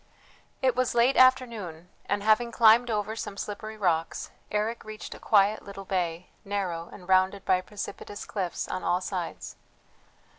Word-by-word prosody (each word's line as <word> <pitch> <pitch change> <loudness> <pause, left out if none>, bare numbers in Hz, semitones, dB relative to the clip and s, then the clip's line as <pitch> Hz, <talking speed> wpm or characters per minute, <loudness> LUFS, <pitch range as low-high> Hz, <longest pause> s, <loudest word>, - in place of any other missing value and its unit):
It 255 -2 +3
was 255 -1 0
late 240 +3 +4
afternoon; 230 -11 +3 0.2
and, 205 0 0
having 220 +2 +3
climbed 230 +1 +6
over 215 0 -1
some 200 -3 -6
slippery 215 +2 -6
rocks, 165 -5 -1 0.2
Eric 215 +3 -1
reached 215 0 -8
a - - -12
quiet 205 0 +3
little 195 -1 -9
bay, 175 -2 -2
narrow, 185 -4 -3
and 180 - -12
rounded 190 +1 +3
by 185 -1 +3
precipitous 205 +1 -7
cliffs 185 -4 -3
on 185 - -4
all 180 - +2
sides. 185 -2 -5
205 Hz, 150 wpm, -27 LUFS, 185-220 Hz, 0.2 s, climbed